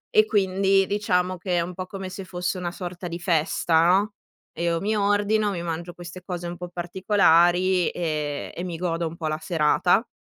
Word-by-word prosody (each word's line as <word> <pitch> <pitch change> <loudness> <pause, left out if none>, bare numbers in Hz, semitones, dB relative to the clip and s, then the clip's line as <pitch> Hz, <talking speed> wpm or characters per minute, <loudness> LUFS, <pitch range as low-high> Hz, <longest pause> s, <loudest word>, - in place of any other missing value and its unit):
e 215 - +7
quindi 195 -1 +2
diciamo 185 -3 0
che 180 0 -1
è 170 - +3
un 180 +2 -4
po' 185 +1 -6
come 195 -1 -6
se 190 +1 -7
fosse 180 0 -3
una 175 -1 -3
sorta 175 -1 -6
di 170 - -5
festa, 165 -1 +2
no; 200 +3 +3 0.4
e - - -5
io 170 -1 +1
mi 215 +4 -1
ordino, 205 +1 +2
mi 175 -3 -4
mangio 170 +1 -4
queste 175 +1 -10
cose 175 -2 -5
un 175 - -5
po' 180 +1 -7
particolari, 175 0 +3
ehm, 150 -4 -3
e 175 - -5
mi 175 -2 -4
godo 170 -1 -1
un 165 +1 -8
po' 160 - -3
la 155 0 -2
serata. 175 +6 +2
180 Hz, 200 wpm, -24 LUFS, 170-195 Hz, 0.4 s, e